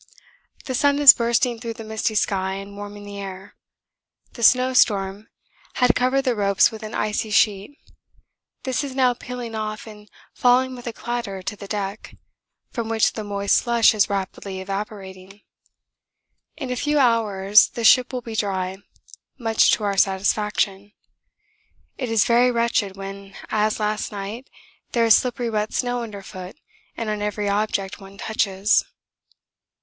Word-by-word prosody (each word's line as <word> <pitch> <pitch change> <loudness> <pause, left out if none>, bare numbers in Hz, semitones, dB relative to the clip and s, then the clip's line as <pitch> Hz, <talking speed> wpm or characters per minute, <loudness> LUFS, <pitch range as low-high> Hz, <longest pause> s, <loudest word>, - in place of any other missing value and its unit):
The 265 - -3
sun 285 +3 +2
is 290 -2 +10
bursting 235 0 0
through 230 -1 -6
the 225 - -8
misty 220 0 -2
sky 190 -2 0
and 200 +1 -8
warming 205 0 -8
the 200 0 -8
air. 195 0 -8 0.8
The 235 - -11
snowstorm 215 -5 +3 0.5
had 250 -2 +4
covered 255 +2 +1
the 255 -2 +1
ropes 200 -2 +3
with 220 -1 -9
an 215 0 -7
icy 215 +1 -1
sheet 210 +5 +1 0.9
this 260 +1 -1
is 270 -2 -6
now 255 -2 +3
peeling 245 -1 -7
off 215 -1 -4
and 210 -2 -13 0.2
falling 255 +1 +2
with 245 -1 -10
a - - -2
clatter 230 -5 -5
to 210 - -4
the 200 -1 -10
deck, 200 0 -5 0.6
from 230 -2 -4
which 225 -1 +2
the 215 - -5
moist 200 -1 0
slush 235 -2 +3
is 210 -2 +2
rapidly 195 -1 -4
evaporating. 195 0 -7 1.2
In 265 -4 -5
a - - -1
few 295 +4 0
hours 215 -5 +4
the 235 - -6
ship 250 +3 +5
will 250 -1 -4
be 225 -1 -7
dry 190 -3 -2 0.6
much 225 -3 +3
to - - 0
our 200 -1 -1
satisfaction; 200 +1 0 1.1
it 255 -3 -3
is 225 -2 +3
very 245 +1 +4
wretched 230 -5 0
when, 195 0 -9 0.2
as 215 0 +1
last 215 0 -2
night, 210 +5 -7 0.4
there 235 -1 +3
is 225 - +7
slippery 245 -2 -1
wet 215 0 -2
snow 245 -1 -1
underfoot 195 -4 -8 0.4
and 230 - -3
on 210 -1 -2
every 210 0 -2
object 200 -1 -1
one 195 0 -13
touches. 200 -1 +1
215 Hz, 155 wpm, -22 LUFS, 200-240 Hz, 1.2 s, is